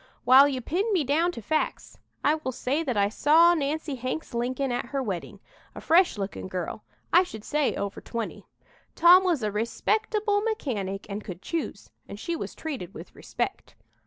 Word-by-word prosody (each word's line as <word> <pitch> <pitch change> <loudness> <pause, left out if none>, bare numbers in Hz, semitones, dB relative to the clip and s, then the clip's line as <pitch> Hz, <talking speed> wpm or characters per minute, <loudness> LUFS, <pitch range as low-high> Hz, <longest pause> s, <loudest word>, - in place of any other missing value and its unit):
"While 265 +3 +8
you 265 -3 -2
pin 385 - -1
me 350 -6 +2
down 315 +6 +2
to 230 - -8
facts, 310 +7 -2 0.2
I 295 - +4
will 310 -4 -3
say 265 +5 -1
that 260 -9 -2
I 200 0 +4
saw 320 +10 +5
Nancy 305 -1 -2
Hanks 255 +4 -4
Lincoln 255 +3 -1
at 245 - -2
her 275 +1 -2
wedding, 190 -7 -5 0.4
a - - -6
fresh 345 - +3
looking 195 -1 -4
girl, 185 +3 -5 0.3
I 350 - +8
should 220 - -7
say 295 +2 0
over 200 0 -4
twenty. 230 -1 -5 0.5
Tom 355 +2 +7
was 340 -10 +1
a 210 - 0
respectable 415 - 0
mechanic 220 - -3
and 205 +1 -5
could 185 -2 -8
choose, 330 - -4 0.2
and 200 - -9
she 340 +9 -3
was - - -6
treated 260 - -6
with - - -10
respect. - - -5
275 Hz, 180 wpm, -26 LUFS, 220-335 Hz, 0.5 s, While